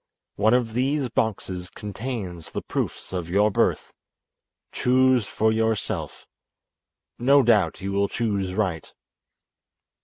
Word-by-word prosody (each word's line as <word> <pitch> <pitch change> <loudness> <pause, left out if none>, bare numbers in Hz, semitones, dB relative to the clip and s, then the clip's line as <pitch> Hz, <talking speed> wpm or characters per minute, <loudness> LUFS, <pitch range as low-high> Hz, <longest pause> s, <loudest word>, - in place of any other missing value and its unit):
One 110 +4 +3
of 120 -3 0
these 135 +2 0
boxes 95 -7 -2
contains 105 -6 -6
the - - -5
proofs - - -4
of 90 -2 -3
your 105 +4 +3
birth. - - 0 0.8
Choose 130 -3 +3
for 110 0 +1
yourself. 110 -1 -2 0.9
No 140 +3 +5
doubt 105 -7 +2
you 100 +1 -3
will 100 0 +1
choose 100 -5 -2
right." 95 -7 -2
110 Hz, 115 wpm, -24 LUFS, 95-125 Hz, 0.9 s, No